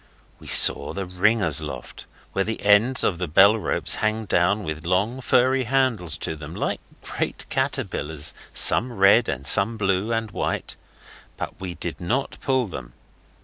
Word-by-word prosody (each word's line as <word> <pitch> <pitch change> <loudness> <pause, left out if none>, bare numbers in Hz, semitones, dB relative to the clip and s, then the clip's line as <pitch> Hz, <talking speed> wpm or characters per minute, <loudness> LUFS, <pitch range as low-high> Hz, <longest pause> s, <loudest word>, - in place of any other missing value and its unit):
We - - -14
saw 70 - +4
the 100 0 -5
ringers' 90 -3 +1
loft - - -9 0.3
where 95 - 0
the 110 +2 -5
ends 105 +6 +3
of 90 -4 -1
the 90 - -3
bellropes 100 +7 +3
hang 110 0 -1
down 95 +3 +1
with 80 -2 -6
long, 100 +9 -1
furry 130 +1 +2
handles 125 -8 0
to - - -4
them 75 +2 -10
like - - -3 0.2
great - - -4
caterpillars, 75 0 -2 0.2
some 125 +1 +4
red, 100 +3 +4
and 70 +1 -5
some 105 - +5
blue 100 +1 -1
and 115 -2 -2
white, - - -4 0.6
but - - -7
we 90 -2 -6
did - - -6
not 125 +10 -3
pull 130 -2 0
them. 65 - -9
100 Hz, 155 wpm, -23 LUFS, 85-115 Hz, 0.6 s, some